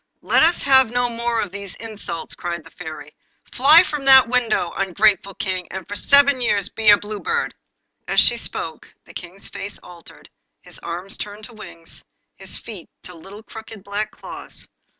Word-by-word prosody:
'Let - - +3
us 335 +2 +4
have 265 -3 +6
no 245 +1 0
more 235 0 -1
of 200 - -4
these 200 -1 -7
insults,' 215 -7 -7
cried 170 -2 -5
the 165 - -16
Fairy. 155 -3 -9 0.4
'Fly 300 +7 +7
from 300 -5 -5
that 265 -2 +8
window, 230 -7 0
ungrateful 195 0 +1
King, 185 -2 -3
and 190 -2 -7
for 205 - -6
seven 280 +3 +4
years 205 -4 +1
be 220 -1 +2
a 205 - +9
Blue 205 0 -7
Bird.' 470 - -2 0.5
As - - +3
she - - +5
spoke - - -6
the - - -15
King's 180 +2 -8
face 205 - -7
altered, 170 -2 -15 0.3
his - - -11
arms 175 +3 -6
turned 210 +1 -8
to 235 - -8
wings, 170 -6 -11 0.3
his - - -3
feet 205 -7 -9
to 180 - -10
little 195 +6 -12
crooked 220 -2 -11
black 205 +1 -3
claws. - - -11
210 Hz, 175 wpm, -21 LUFS, 185-240 Hz, 0.5 s, a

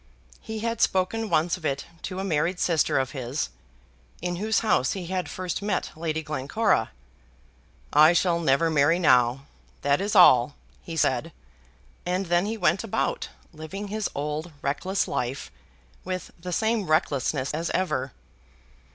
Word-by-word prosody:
He 220 -1 -6
had 230 0 -2
spoken 210 +4 +1
once 170 +2 +2
of 175 - -16
it 140 -3 -2 0.2
to 185 - -5
a 190 - -2
married 175 0 0
sister 165 -4 +2
of 130 -1 0
his, 130 - -3 0.7
in 175 0 -3
whose 220 +4 +1
house 210 - +2
he 190 -3 -5
had 180 -2 -3
first 185 0 -4
met 200 -2 -2
Lady 160 0 -3
Glencora. 150 - 0 1.0
"I 155 +3 +7
shall 175 -1 +2
never 160 +1 +2
marry 155 +2 +4
now, 130 -5 +3 0.4
that 140 +3 +2
is 205 +2 -1
all," 135 -7 +7 0.3
he 165 -1 -7
said 135 +2 +1 0.7
and 180 +2 -1
then 175 +2 +1
he 225 +1 -3
went 190 -1 +2
about, 225 - -2 0.2
living 190 +6 -7
his 215 0 -2
old 150 +4 -3
reckless 185 +8 -1
life, 125 - -3 0.5
with 185 -1 -5
the 180 +2 -6
same 220 +2 0
recklessness 145 -3 +1
as 165 +2 -2
ever. 135 -8 -1
170 Hz, 150 wpm, -26 LUFS, 145-190 Hz, 1.0 s, I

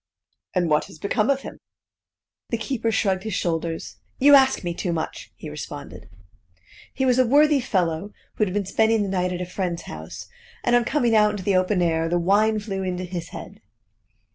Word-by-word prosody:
"And 180 -2 +2
what 150 -1 +2
has - - -13
become 210 - 0
of 275 -1 +2
him?" - - -9 0.9
The 230 - -1
keeper 225 0 -2
shrugged 195 -4 +1
his 220 -2 -4
shoulders. 165 -1 -2 0.2
"You 285 +2 +6
ask 265 -5 +5
me 175 -1 -2
too 175 +1 -3
much," 160 -1 -4
he - - -9
responded. - - -8 0.8
He 265 - -1
was 255 -1 +3
a 255 - +4
worthy 295 +3 +5
fellow 185 -5 -1 0.2
who 215 - +1
had 185 - -4
been 200 +1 -1
spending 220 +2 +2
the 200 - -3
night 180 -1 0
at 180 0 -3
a - - -2
friend's 175 -2 -3
house, 80 +1 -8 0.4
and 240 - +3
on 240 -1 +3
coming 240 -6 +2
out 210 -1 +5
into 205 -2 -4
the 195 0 +1
open 185 0 +2
air, 165 -1 +1
the 175 - +1
wine 205 +5 +3
flew 200 -2 -4
into 185 -1 -3
his 175 -2 -5
head. - - -10
195 Hz, 195 wpm, -24 LUFS, 175-225 Hz, 0.9 s, You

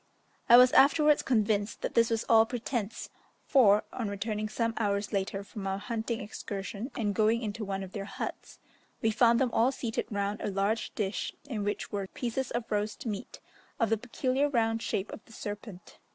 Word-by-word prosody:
I 240 - +10
was 250 0 +8
afterwards 300 +1 +5
convinced 215 -3 0
that - - -2
this 230 -1 +4
was 225 -1 0
all 225 -1 +6
pretence, 230 -3 -4 0.3
for 210 -7 +5
on 230 -5 -3
returning 210 +1 -3
some 230 +1 -1
hours 205 -1 -1
later 195 0 -1
from 200 -1 -7
our 195 0 -1
hunting 225 +2 -3
excursion 205 +2 -5
and 210 -3 0
going 220 +4 +2
into 215 +1 -4
one 195 -1 -3
of 185 - -9
their 200 -1 -5
huts, - - -6 0.5
we 225 - +3
found 235 +1 +4
them 260 -3 +1
all 240 +4 +4
seated 235 -4 -3
round 200 0 -2
a - - -1
large 200 +3 0
dish 200 -2 -2
in 225 -7 -3
which 205 0 -3
were 200 -2 -3
pieces 245 +5 -3
of 240 -1 -4
roast 210 +2 -2
meat 210 -3 -5 0.4
of 230 -2 +1
the - - +5
peculiar 255 +5 0
round 225 -3 +1
shape 195 -2 -2
of - - -9
the 225 - -16
serpent. 205 -3 -8
220 Hz, 185 wpm, -30 LUFS, 205-235 Hz, 0.5 s, I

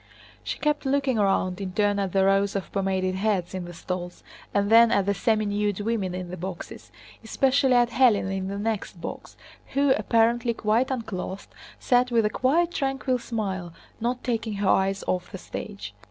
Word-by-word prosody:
She - - -4
kept 300 -2 0
looking 275 -2 +1
round 195 -2 +1
in 185 -2 -4
turn 205 0 +1
at 195 -2 -1
the 190 0 +3
rows 195 +1 +2
of 195 - -4
pomaded 190 -1 0
heads 190 -2 -1
in 185 -2 -4
the 175 - -9
stalls 180 +1 -5 0.3
and 200 +1 0
then 230 0 +8
at 200 -4 +2
the 200 - +1
seminude 210 -1 0
women 205 -4 -1
in 180 -1 -6
the 180 - -6
boxes, 180 0 -7 0.3
especially 265 +3 +2
at 240 -1 +3
Hélène 220 -6 +3
in 190 0 -3
the 200 +1 -4
next 210 -3 -3
box, - - -8 0.4
who—apparently 235 -4 +2
quite 220 +5 +1
unclothed—sat 230 +2 -2
with 230 -3 +2
a 210 - +1
quiet 325 +9 +2
tranquil 270 -2 -1
smile, 190 -8 -4 0.3
not 245 +2 -2
taking 225 -3 -2
her 200 -1 0
eyes 195 +1 +2
off 180 -1 -2
the - - -6
stage. - - -7
210 Hz, 170 wpm, -25 LUFS, 190-240 Hz, 0.4 s, then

